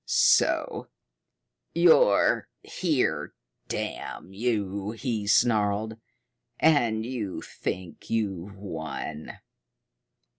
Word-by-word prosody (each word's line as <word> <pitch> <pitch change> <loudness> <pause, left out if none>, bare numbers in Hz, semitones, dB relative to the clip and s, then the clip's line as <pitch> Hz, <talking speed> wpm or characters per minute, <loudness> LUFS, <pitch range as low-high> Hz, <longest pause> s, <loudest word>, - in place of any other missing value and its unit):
"So - - +3 0.9
you're 165 - +5
here, - - -1 0.3
damn 95 - -5
you!" 100 -3 -1
he 115 -3 -3
snarled. 110 0 +2 0.6
"And 120 -8 +3
you 115 -6 -4
think 90 -2 -6
you've 100 -4 -2
won. 80 -5 -6
105 Hz, 70 wpm, -27 LUFS, 95-115 Hz, 0.9 s, you're